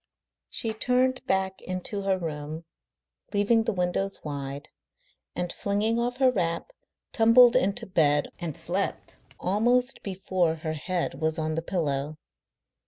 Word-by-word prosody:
She 225 -2 +1
turned 250 +3 +1
back 190 0 0
into 185 +3 -3
her 195 -1 +1
room, 155 -1 -5 0.7
leaving 220 +3 +3
the - - +1
windows 190 +1 -1
wide, 140 -1 -5 0.7
and, 175 0 -2
flinging 210 +3 0
off 245 +1 -1
her 260 -1 +4
wrap, 175 - -2 0.4
tumbled 230 +1 +6
into 195 +1 +1
bed 150 -5 +2
and 165 -5 -4
slept 175 +4 -3 0.2
almost 245 +7 +1
before 185 -3 0
her 155 0 -4
head 175 +3 -3
was 160 +1 0
on 155 0 -1
the 165 - -1
pillow. 155 -4 -2
185 Hz, 130 wpm, -27 LUFS, 160-220 Hz, 0.7 s, tumbled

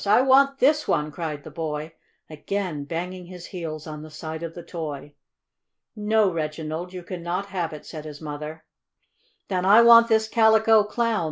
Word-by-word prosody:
I 215 +5 +5
want 275 +1 +4
this 300 +3 +3
one!" 150 0 0
cried 150 -2 -5
the - - -10
boy, 155 -1 -4 0.3
again 160 -1 -4
banging 180 +3 -5
his 180 -1 -10
heels 160 -4 -6
on 150 -1 -7
the 155 - -10
side 160 +1 -7
of 165 -1 -6
the 175 - -8
toy. 150 -4 -6 0.8
"No, 210 -1 +2
Reginald, 160 +2 -4
you 180 -1 -8
cannot 175 +2 -4
have 175 -4 -2
it," 150 - -10
said 155 -2 -8
his 150 -1 -8
mother, 150 +1 -7 0.8
"Then 185 -2 -1
I 210 +5 +7
want 235 0 +8
this 220 -1 +2
Calico 220 -1 +5
Clown!" 230 +1 0
175 Hz, 170 wpm, -24 LUFS, 155-215 Hz, 0.8 s, want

